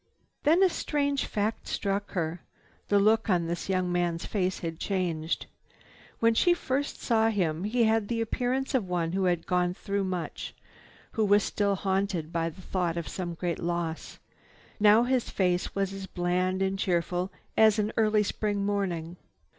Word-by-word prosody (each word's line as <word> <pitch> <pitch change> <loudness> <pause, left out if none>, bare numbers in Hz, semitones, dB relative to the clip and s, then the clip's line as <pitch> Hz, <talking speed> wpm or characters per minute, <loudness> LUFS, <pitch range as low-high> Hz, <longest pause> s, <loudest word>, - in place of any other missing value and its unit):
Then 330 +6 +4
a 380 - +6
strange 285 -4 -1
fact 215 +1 -2
struck 200 0 -2
her—the 175 +3 -3
look 220 +2 +3
on 175 -3 +2
this 170 +3 -4
young 185 -1 +1
man's 175 -1 0
face 190 -3 -1
had 165 -1 -4
changed. 175 -5 -1 0.7
When 230 0 +4
she 345 +9 +4
first 280 -3 -2
saw 225 -2 +2
him 175 -5 0
he 235 +3 +2
had 220 -1 +2
the 230 0 -1
appearance 250 +4 -1
of 240 -8 +1
one 170 -2 0
who 190 +1 0
had 175 -2 +1
gone 180 -1 +1
through 200 0 -2
much, 180 -2 -4 0.6
who 220 - 0
was 205 0 +4
still 200 -1 0
haunted 190 -4 -1
by 165 0 0
the 165 - -13
thought 175 -3 -1
of 170 -3 -3
some 175 +3 -4
great 170 0 -2
loss. 170 -1 -3 0.6
Now 210 +2 +6
his 250 -1 0
face 180 -2 0
was 195 -1 0
as 195 -1 -6
bland 185 +1 0
and 195 0 -1
cheerful 180 0 0 0.2
as 220 -1 +5
an 210 0 0
early 215 -1 +3
spring 205 -1 -1
morning. 180 -4 -2
195 Hz, 165 wpm, -28 LUFS, 175-215 Hz, 0.7 s, a